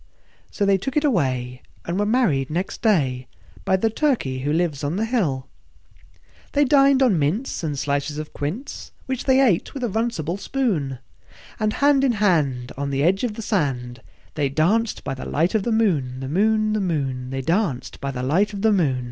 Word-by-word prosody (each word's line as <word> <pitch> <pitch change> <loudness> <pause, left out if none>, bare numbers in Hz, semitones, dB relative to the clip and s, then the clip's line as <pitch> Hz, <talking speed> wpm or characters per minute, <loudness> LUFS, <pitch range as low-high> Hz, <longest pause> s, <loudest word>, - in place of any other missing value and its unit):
So 200 - -1
they 195 -1 +3
took 270 +9 -3
it 300 - +2
away, 130 - 0 0.2
and 175 +3 -2
were 205 - +1
married 200 - +2
next 175 +5 -3
day 135 - +1 0.4
By 190 - +3
the 220 +3 0
Turkey 225 - 0
who 145 +3 -1
lives 160 -3 0
on 145 +4 -1
the 215 +3 0
hill. 170 - -1 1.1
They 290 0 +4
dined 275 0 +5
on 210 -10 +3
mince 175 - -1
and 150 -3 -2
slices 140 +1 -2
of 155 0 -6
quince, 180 - -5
Which 260 -2 -3
they 265 -1 +4
ate 240 -7 +2
with 270 - -4
a - - +1
runcible 200 -5 -2
spoon; 185 - -1 0.6
And 215 0 0
hand 280 -1 +3
in 260 -3 +3
hand, 150 - +1
on 140 +1 -3
the 140 0 0
edge 190 +6 +2
of 230 -4 -1
the 225 - -6
sand, 130 - -2 0.3
They 145 -3 0
danced 200 +11 +1
by - - -3
the 130 - -7
light 165 +4 0
of 220 - +2
the 235 - -2
moon, 155 - +1
The 135 - -5
moon, 215 +5 +2
The 215 - 0
moon, 135 -8 -2
They 135 0 -4
danced 165 - -1
by 140 - -2
the 125 -2 -4
light 185 +11 +1
of 200 0 -5
the 220 - +4
mo 160 -10 +2
180 Hz, 200 wpm, -22 LUFS, 140-225 Hz, 1.1 s, dined